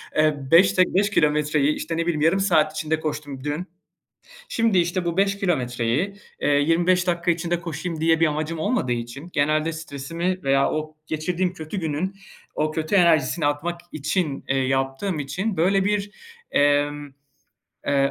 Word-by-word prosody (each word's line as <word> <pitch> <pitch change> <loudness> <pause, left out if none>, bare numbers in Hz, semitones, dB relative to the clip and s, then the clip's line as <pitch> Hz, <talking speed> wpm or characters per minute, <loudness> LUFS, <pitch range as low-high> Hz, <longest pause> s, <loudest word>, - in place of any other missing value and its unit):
eee, 155 -1 +3
beş 185 +3 +6
d 185 - +7
beş 200 +3 +3
kilometreyi, 150 -3 +2
işte, 165 +1 -4
ne 165 - 0
bileyim, 160 -4 -1
yarım 165 +5 +3
saat 155 -6 +3
içinde 155 0 -1
koştum 145 -3 -5
dün. 150 +5 -3 0.8
Şimdi, 230 - +2
işte, 175 +1 0
bu 170 0 -2
5 200 0 +2
kilometreyi, 140 - -1 0.2
eee, - - 0
25 170 +5 +3
dakika 175 0 +1
içinde 170 +1 -1
koşayım 165 0 -5
diye 165 0 +3
bir 165 - +5
amacım 155 +2 -2
olmadığı 160 - 0
için 120 +8 -6
genelde 155 +2 +1
stresimi 165 +4 -4
veya 135 0 +2
o 155 0 -4
geçirdiğim 175 +3 -1
kötü 160 +3 -6
günün 165 +5 -2 0.4
o 155 0 0
kötü 155 +4 -2
enerjisini 170 -3 +3
atmak 170 +4 -2
için, 155 -1 -2
eee, 135 - +1
yaptığım 135 +7 -1
için, 190 +9 -3
böyle, 190 +4 +2
bir, 205 0 0 0.4
eee, 145 0 +4 1.0
eee, 140 -1 +2
160 Hz, 155 wpm, -23 LUFS, 145-180 Hz, 1.0 s, d